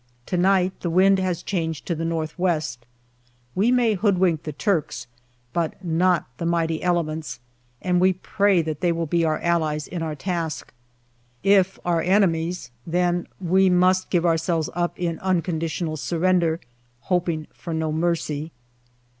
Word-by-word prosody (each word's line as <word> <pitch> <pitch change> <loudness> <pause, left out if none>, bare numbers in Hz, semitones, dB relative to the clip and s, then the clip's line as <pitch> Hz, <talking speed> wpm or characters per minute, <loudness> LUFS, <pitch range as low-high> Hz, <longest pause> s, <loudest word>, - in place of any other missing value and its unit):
To - - -2
night 185 +1 +2
the 175 - -2
wind 190 +3 +4
has 180 -2 -1
changed 165 -5 -3
to 175 - -1
the 165 0 -3
north 165 0 -3
west; 155 -9 -1 0.7
we 215 +6 +2
may 245 -3 +3
hoodwink 185 -5 +2
the 155 - -5
Turks, 150 - -1 0.5
but 170 -2 -1
not 175 +1 +2
the 170 - -2
mighty 165 -2 0
elements, 160 -6 -1 0.4
and 180 -1 +2
we 185 0 +5
pray 195 -1 +1
that 155 -2 -4
they 175 - +2
will 165 0 -1
be 170 +2 +1
our 155 -1 +1
allies 155 -3 0
in 175 - -5
our 160 -2 -3
task. 165 0 -4 0.7
If 195 -1 +4
our 170 -2 +2
enemies, 175 - +1 0.2
then 175 +1 0
we 190 +1 +3
must 185 +1 +3
give 175 -2 +1
ourselves 165 -1 +1
up 175 0 -1
in 170 -2 -2
unconditional 165 -3 -1
surrender, 170 +1 +1 0.4
hoping 170 -3 -1
for 170 - -8
no 160 -1 -1
mercy. 160 -1 -1
170 Hz, 150 wpm, -23 LUFS, 160-185 Hz, 0.7 s, we